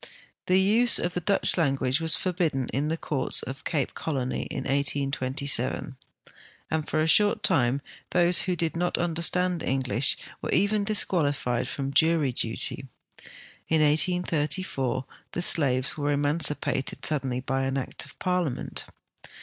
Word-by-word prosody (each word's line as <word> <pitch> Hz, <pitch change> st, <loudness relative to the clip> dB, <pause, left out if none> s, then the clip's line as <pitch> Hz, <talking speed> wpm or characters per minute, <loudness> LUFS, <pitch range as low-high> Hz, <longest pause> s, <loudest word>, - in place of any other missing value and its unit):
The 185 Hz, +1 st, +4 dB
use 225 Hz, +5 st, +4 dB
of 175 Hz, -, -1 dB
the 180 Hz, -, -3 dB
Dutch 195 Hz, +3 st, +2 dB
language 135 Hz, -2 st, 0 dB
was 160 Hz, 0 st, +3 dB
forbidden 165 Hz, -8 st, -1 dB
in 145 Hz, +3 st, -2 dB
the 160 Hz, +1 st, -2 dB
courts 140 Hz, -5 st, 0 dB
of 135 Hz, +1 st, -8 dB
Cape 145 Hz, -5 st, -2 dB
Colony 130 Hz, -5 st, -3 dB
in -, -, -4 dB
1827, 140 Hz, 0 st, 0 dB, 0.8 s
and 160 Hz, -1 st, -2 dB
for 155 Hz, -, 0 dB
a -, -, +1 dB
short 205 Hz, +5 st, +3 dB
time 125 Hz, +2 st, +1 dB, 0.3 s
those 175 Hz, 0 st, +4 dB
who 185 Hz, -, -1 dB
did 165 Hz, -2 st, 0 dB
not 175 Hz, +1 st, -1 dB
understand 175 Hz, +1 st, 0 dB
English 130 Hz, 0 st, +1 dB, 0.2 s
were -, -, -5 dB
even 205 Hz, +5 st, +1 dB
disqualified 145 Hz, -, +1 dB
from 135 Hz, -1 st, -4 dB
jury 160 Hz, -2 st, +2 dB
duty. 115 Hz, +3 st, -2 dB, 0.8 s
In 160 Hz, -1 st, +2 dB
1834 150 Hz, -4 st, 0 dB, 0.3 s
the 175 Hz, -, -2 dB
slaves 130 Hz, -6 st, +4 dB
were 145 Hz, -1 st, -1 dB
emancipated 145 Hz, -1 st, -1 dB
suddenly 135 Hz, -5 st, 0 dB
by 135 Hz, +1 st, -2 dB
act 135 Hz, -1 st, -2 dB
of -, -, -15 dB
Parliament. 180 Hz, -8 st, -2 dB
150 Hz, 135 wpm, -26 LUFS, 135-175 Hz, 0.8 s, The